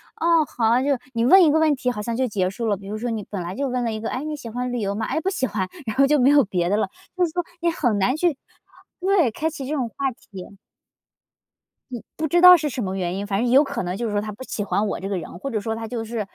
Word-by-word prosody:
啊， 330 -1 +3
好， 235 -2 +1
就 280 - -1
是 260 - +1
你 230 0 +1
问 375 +8 +7
一 310 - +5
个 315 - +3
问 310 -2 +3
题 255 -1 -1
好 210 - -5
像 235 +1 -3
就 260 +2 0
结 190 -5 -1
束 230 +4 -5
了， 205 - +1
比 195 0 -12
如 215 +1 -4
说 240 - -3
你 220 -3 -3
本 195 -3 -4
来 175 +2 -5
就 275 +1 -1
问 250 -1 -1
了 230 - -1
一 215 - -4
个， 225 - -4
诶， 260 - -4
你 305 0 -3
喜 240 -5 -8
欢 250 +2 -3
旅 245 - -2
游 200 -1 -1
吗？ 220 +1 -2
哎， - - -1
不 380 - 0
喜 260 -9 -1
欢， 190 -3 -2 0.2
然 220 - -3
后 275 - +6
就 295 +1 +3
没 260 +2 +5
有 290 -2 +6
别 180 -3 -1
的 205 - +2
了， 215 - 0 0.3
就 360 - +3
是 320 - -5
说 355 +1 -1 0.2
你 340 - +2
很 245 -10 0
难 250 +8 +2
去 315 -3 +1 0.6
对， 365 - +2
开 320 +8 -2
启 285 -4 -7
这 305 - -3
种 255 -5 -2
话 270 +3 -2
题。 200 -4 -12 1.4
呃， 235 - -5
不 315 - -2
知 345 +3 +2
道 360 0 +10
是 305 -3 -1
什 250 -2 -4
么 190 -1 -3
原 180 -1 -2
因， 200 +1 -4
反 200 +1 0
正 245 - +1
有 270 +3 +7
可 275 -7 -4
能 180 +2 -3
就 240 - -3
是 210 - -3
说 205 - +1
他 215 0 -5
不 225 +6 -9
喜 210 - -4
欢 205 +1 0
我 - - -3
这 195 - -4
个 195 - -1
人， 175 +1 -8
或 275 - -5
者 220 - -1
说 225 +2 -3
他 225 0 -5
就 230 -2 -4
是， 230 +1 -4
240 Hz, 335 characters per minute, -23 LUFS, 205-285 Hz, 1.4 s, 道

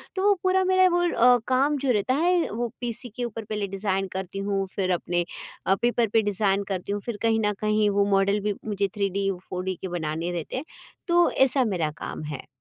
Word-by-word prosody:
तो 380 - -1
वो 410 - +6
पूरा 375 0 +3
मेरा 370 0 +4
वो 350 - +2
अ, 245 -2 +5
काम 275 +3 +2
जो 265 -2 0
रहता 220 +4 +1
है 345 +2 +2
वो 235 +2 -2
पीसी 240 +1 -4
के 245 - -3
ऊपर 225 -1 -4
पहले 210 -1 -3
डिज़ाइन 195 0 -1
करती 190 +1 -5
हूँ 195 -1 0
फिर 185 -2 0
अपने 175 0 -1 0.4
अ, 195 - +4
पेपर 240 -1 +2
पे 225 - +5
डिज़ाइन 200 -1 +1
करती 185 +2 -4
हूँ 205 0 -2
फिर 235 -3 -4
कहीं 225 -1 +2
न 210 - +1
कहीं 215 0 +2
वो 200 0 +2
मॉडल 195 +1 +3
भी 205 0 -1
मुझे 205 -2 0
3D, 195 0 0 0.2
4D 185 0 -2
के 190 - -3
बनाने 160 +2 -3
रहते 170 -3 -5
हैं, 275 - -4 0.4
तो 345 0 +4
ऐसा 265 0 +4
मेरा 160 -4 -1
काम - - -5
है। 135 - -8
210 Hz, 215 wpm, -25 LUFS, 195-250 Hz, 0.4 s, वो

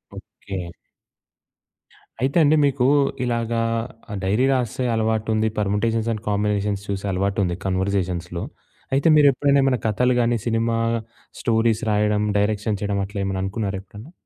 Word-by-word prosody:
Okay. 95 -3 -7 1.5
అయితే 135 +5 +1
అండి. 150 +1 +5
మీకు 135 -2 +1 0.4
ఇలాగా 115 -1 -1 0.5
ఆహ్, 105 - -3
డైరీ 105 +7 +2
రాసే 125 0 -1
అలవాటుంది 110 0 0
పర్ముటేషన్స్ 110 +2 0
అండ్ 110 -1 -7
కాంబినేషన్స్ 105 -1 0
చూసే 100 0 -3
అలవాటుంది 95 -1 0
కన్వర్జేషన్స్‌లో. 95 -2 -1 0.5
అయితే 135 +4 +2
మీరెప్పుడైనా 140 -1 +4
ఏమైనా 130 -2 +2
కథలు 125 +4 +2
గాని, 120 0 +2
సినిమా 115 0 0 0.6
స్టోరీస్ 115 -1 +1
రాయడం, 105 0 +2 0.2
డైరెక్షన్ 105 0 0
చేయడం 100 -1 -1
అట్లేమన్నా 100 -1 -3
అనుకున్నారా 100 -1 -3
ఎప్పుడన్నా? 105 - -13
105 Hz, 120 wpm, -22 LUFS, 100-115 Hz, 1.5 s, అండి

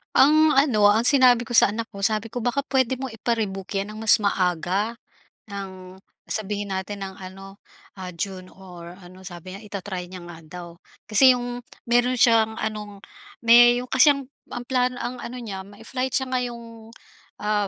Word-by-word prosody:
Ang 310 +3 +5
ano, 220 -8 +4
ang 225 +3 +3
sinabi 250 -4 +4
ko 240 - -2
sa 205 - +6
anak 225 +2 -5
ko, 200 -2 -8
sabi 215 +2 +1
ko, 225 +1 -6
baka 245 +3 0
puwede 260 -2 +1
mo 265 - -4
ipa-rebook 220 -5 -4
'yan 200 +2 -3
ng 215 - -9
mas 220 - +6
maaga, 195 +3 -1 0.5
ng 190 -2 -9 0.2
sabihin 205 -2 -3
natin 195 +1 -5
ng 190 - -9
ano, 195 +1 -11 0.4
ah, 185 - -6
June 185 +1 -6
or 180 -2 -12
ano, 185 0 -15
sabi 185 -1 -10
niya, 200 - -10
ita-try 190 -3 -6
niya 180 -1 -10
nga 175 -1 -11
daw. 175 +2 -10 0.4
Kasi 250 +4 +5
yung 245 0 -6 0.2
meron 245 +1 +1
siyang 225 -1 +3
anong 210 -2 -6 0.4
me 240 +1 +7
yung 250 - -12
kasi 260 +3 +6
ang 275 -1 -7 0.2
ang 245 0 -7
plano, 250 0 0
ang 245 0 -5
ano 250 +1 -7
niya, 200 -5 -6
may-flight 225 +6 -6
siya 265 - -3
ngayong, 235 -3 -5 0.5
ah, 210 -1 0
215 Hz, 175 wpm, -23 LUFS, 190-245 Hz, 0.5 s, me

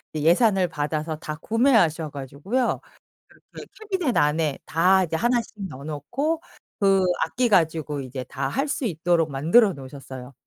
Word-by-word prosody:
이 150 - -2
예산을 190 +1 +4
받아서 155 0 -3
다 155 0 -6
구매하셔 190 - +2
가지고요. 145 - -2 0.5
그렇게 - - -13 0.2
캐비닛 355 - 0
안에 150 -1 +1
다 185 +3 +3
이제 165 - -4
하나씩 240 +5 0 0.2
넣어 135 -1 -10
놓고 260 - -2 0.4
그 195 -2 +3 0.2
악기 250 0 0
가지고 160 -6 +1
이제 130 0 -6
다 135 +2 -3
할 275 - -1
수 290 0 -3
있도록 170 -3 +1
만들어 170 - +4
놓으셨어요. 135 -2 -10
165 Hz, 320 characters per minute, -24 LUFS, 145-220 Hz, 0.5 s, 예산을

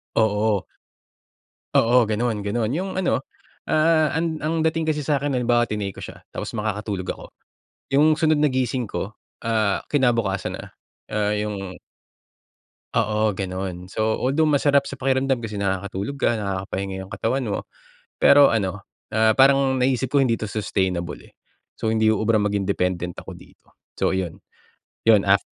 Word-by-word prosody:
Oo. 105 -2 +2 1.1
Oo, 120 +1 +5
ganun, 110 -1 -1
ganun. 110 +1 0
Yung 190 +3 -3
ano, 180 -8 0 0.4
ah, 155 0 +3
an 160 0 -1
ang 160 +1 0
dating 160 0 0
kasi 155 -1 0
sa'kin 145 -1 0
halimbawa 120 -1 +2
tinake 105 -3 -4
ko - - -8
siya, - - -10
tapos - - -6
makakatulog 105 -3 -3
ako. - - -5 0.7
Yung 150 +3 +5
sunod 155 -1 +2
na 150 - +4
gising 130 -2 -1
ko, 100 0 -4 0.3
ah, 110 -3 +1
kinabukasan 115 -8 +1
na, - - -8 0.5
ah, 105 -1 0
yung 100 -3 -4 1.2
Oo, 110 0 +1
ganun. 95 -1 -5
So, 110 +2 -1
although 140 +5 +2
masarap 145 -1 +3
sa - - -6
pakiramdam 130 -1 +1
kasi 105 -2 -5
nakakatulog 100 +4 -2
ka, 120 - +2
nakakapahinga 95 -1 -3
yung - - -20
katawan 130 +4 -1
mo. 100 - -1 0.6
Pero 140 0 +7
ano, 100 -2 -1 0.3
ah, 110 0 +5
parang 135 -1 +4
naiisip 130 0 +1
ko 145 - +4
hindi 125 -4 +3
'to - - -7
sustainable, 95 -5 -1
eh, - - -18 0.5
so - - -2
hindi 110 0 +3
uubra 110 +1 +1
maging 100 -1 -1
dependent 90 -3 -1
ako - - -9
dito. - - -20 0.2
So, - - +1
ayun 95 -3 -3 0.6
yun. 110 -3 +6
Af 100 +1 +4
110 Hz, 150 wpm, -23 LUFS, 100-135 Hz, 1.2 s, Pero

